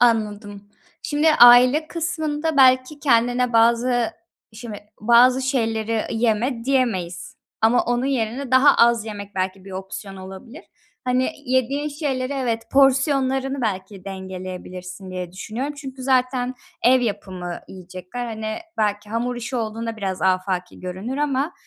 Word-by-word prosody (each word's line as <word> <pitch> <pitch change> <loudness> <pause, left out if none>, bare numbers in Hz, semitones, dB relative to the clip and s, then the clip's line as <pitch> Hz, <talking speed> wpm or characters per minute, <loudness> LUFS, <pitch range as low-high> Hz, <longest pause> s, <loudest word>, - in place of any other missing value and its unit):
Anladım. 210 -3 0 0.3
Şimdi 300 +2 +2
aile 250 +6 +7
kısmında 320 -2 -2
belki 260 +2 +4
kendine 245 -2 +2
bazı 235 +1 +2 0.3
Şimdi, 215 -1 -8 0.2
bazı 245 +4 +5
şeyleri 225 -4 -1
"yeme" 230 +1 0
diyemeyiz. 235 -10 -1 0.2
Ama 225 +3 +3
onun 245 +1 0
yerine 255 0 -2
daha 260 +3 +6
az 235 -2 +4
yemek 205 -2 -8
belki 185 0 -3
bir 195 - -11
opsiyon 195 +1 -7
olabilir. 190 - -10 0.4
Hani, 255 0 +1
yediğin 260 +4 0
şeyleri, 280 -3 -3
evet, 240 -5 -1
porsiyonlarını 270 0 +2
belki 190 -2 -4
dengeleyebilirsin 185 -1 -7
diye 180 -1 -6
düşünüyorum 240 +9 -5
çünkü 270 -2 -8
zaten 255 -1 +1 0.3
ev 255 +1 +5
yapımı 185 -6 -4
yiyecekler. 185 +6 -8
Hani, 220 -1 -4 0.2
belki 205 -1 -1
hamur 240 +2 -2
işi 240 +2 -4
olduğunda 225 0 -3
biraz 190 -3 -4
afaki 185 -1 -1
görünür 185 +8 -5
ama, 290 +2 0
235 Hz, 125 wpm, -22 LUFS, 200-260 Hz, 0.4 s, aile